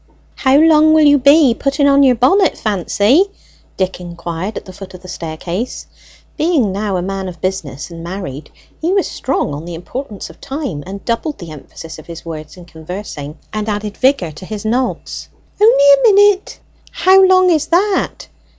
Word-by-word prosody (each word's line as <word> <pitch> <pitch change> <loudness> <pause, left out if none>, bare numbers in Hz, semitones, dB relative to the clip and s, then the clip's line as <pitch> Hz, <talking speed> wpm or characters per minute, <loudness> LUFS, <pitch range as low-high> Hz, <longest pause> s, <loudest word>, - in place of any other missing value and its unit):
"How 265 0 +2
long 315 0 +5
will 310 - +5
you 290 -1 +5
be 280 -1 +5
putting 275 +3 0
on 280 0 +5
your 260 -3 +5
bonnet, 285 - +3
Fancy?" 210 - +2 0.5
Dick 185 -1 -2
inquired 175 +3 -6
at - - -7
the 185 - -11
foot 185 0 -11
of 180 - -14
the - - -11
staircase. 170 +6 -5 0.5
Being 305 - +1
now 200 0 -2
a 175 - -2
man 195 0 -4
of 170 -2 -11
business 155 -5 -4
and 165 0 -9
married, 170 -6 -7 0.3
he 335 +3 0
was 395 -2 +2
strong 255 - -2
on 145 +2 -6
the 170 0 -7
importance 210 +5 -7
of - - -22
time, 265 - -5
and 195 +1 -8
doubled 260 +6 -2
the 170 -4 -10
emphasis 155 +2 -10
of 155 - -14
his 170 0 -9
words 155 0 -8
in 175 - -12
conversing, 160 -3 -8 0.2
and 215 0 -3
added 205 0 -3
vigour 255 - +1
to 150 +5 -11
his 215 -1 -6
nods. 245 +4 -2 0.3
"Only 425 -10 +5
a 280 -1 +6
minute." 410 -1 +3 0.3
"How 380 +1 +4
long 370 -1 +5
is 310 -2 +1
that?" 380 +4 0
210 Hz, 180 wpm, -16 LUFS, 175-285 Hz, 0.5 s, a